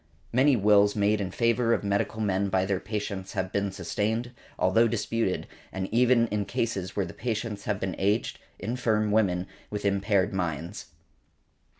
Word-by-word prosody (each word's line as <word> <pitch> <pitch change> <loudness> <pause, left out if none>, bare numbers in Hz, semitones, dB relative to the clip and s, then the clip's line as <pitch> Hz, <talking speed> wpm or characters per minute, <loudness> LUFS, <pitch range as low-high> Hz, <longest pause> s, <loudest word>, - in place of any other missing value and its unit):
Many 130 +3 +5
wills 105 -1 +4
made 105 0 +2
in 95 - -2
favour 115 +2 +2
of - - -4
medical 100 +2 -1
men 100 -1 +1
by 95 0 +1
their 95 -1 0
patients 100 -2 -4
have 95 0 -2
been 100 0 0
sustained, 105 +6 -2 0.3
although 110 +6 +4
disputed, 115 -3 -1 0.3
and 95 0 -3
that 95 - -9
even 120 0 +4
in 105 0 0
cases 110 -7 -2
where 100 - 0
the 85 - -9
patients 110 -3 -3
have 105 -1 -1
been 95 -2 -2
aged, 100 +3 0 0.2
infirm 110 -2 0
women, 95 -4 +2 0.2
with 105 -1 -4
impaired 100 -1 +2
minds. 85 +1 -3
105 Hz, 165 wpm, -27 LUFS, 95-115 Hz, 0.3 s, Many